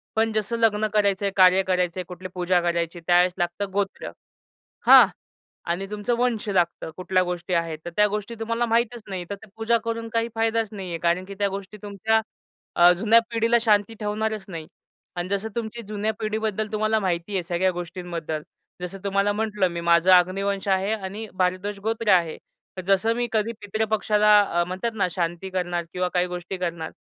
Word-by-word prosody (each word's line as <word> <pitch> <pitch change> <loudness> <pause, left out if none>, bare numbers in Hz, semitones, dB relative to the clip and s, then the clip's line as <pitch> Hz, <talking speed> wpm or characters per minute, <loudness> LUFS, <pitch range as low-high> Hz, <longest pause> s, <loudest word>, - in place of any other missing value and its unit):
पण 225 0 +2
जसं 215 +2 -1
लग्न 215 -1 +2
करायचं 200 -1 +2
आहे, 200 - 0
कार्य 185 0 +6
करायचं 180 -1 0
आहे, - - -2
कुठली 185 +1 -8
पूजा 180 0 +1
करायची. 170 0 -1
त्यावेळेस 180 0 +4
लागतं 185 +3 -2
गोत्र, 200 -1 -2 0.8
हां - - +10 0.6
आणि 190 +3 -1
तुमचं 210 +3 -1
वंश 240 -3 0
लागतं. 175 -4 0
कुठल्या 185 0 +1
गोष्टी 180 0 -3
आहेत, 165 -2 -1
तर 175 - -5
त्या 210 0 +5
गोष्टी 210 +2 -4
तुम्हाला 230 +1 -1
माहीतच 235 0 0
नाही. 185 -2 -4
तर - - -2
ते 205 +2 -14
पूजा 225 +1 +2
करून 230 0 -3
काही 230 0 0
फायदाच 225 -1 +1
नाही 195 -3 -6
आहे, 165 - -3
कारण 175 +2 +1
की 200 +1 -9
त्या 200 -1 +2
गोष्टी 195 +1 -7
तुमच्या 210 +2 +1 0.6
अ, 175 +1 +8
जुन्या 225 +2 +5
पिढीला 230 +1 +2
शांती 215 -1 +2
ठेवणारच 215 0 -2
नाही. 165 -4 -7 0.5
आणि 175 +1 -3
जसं 200 +3 -1
तुमची 235 0 -4
जुन्या 215 +1 -1
पिढीबद्दल 215 -1 -2
तुम्हाला 215 +1 +1
माहिती 180 0 -2
आहे 185 - 0
सगळ्या 175 +2 0
गोष्टींबद्दल. 175 -3 -5 0.4
जसं 180 +2 -6
तुम्हाला 200 +1 +1
म्हटलं 210 -3 0
मी 170 0 -4
माझं 170 +2 +4
अग्निवंश 195 +2 +2
आहे 195 +2 +1
आणि 205 +2 -6
भारद्वाज 185 +2 -1
गोत्र 225 0 -2
आहे. 170 -3 +2 0.5
जसं 195 +4 +3
मी 240 0 0
कधी 220 +1 0
पितृपक्षाला 210 0 +3 0.2
अ, - - +2
म्हणतात 185 +6 -3
ना 200 - +1
शांती 175 +2 -3
करणार 175 -2 -2
किंवा 180 0 -1
काही 180 0 +2
गोष्टी 180 +1 -5
करणार 170 -3 -4
195 Hz, 180 wpm, -24 LUFS, 180-220 Hz, 0.8 s, हां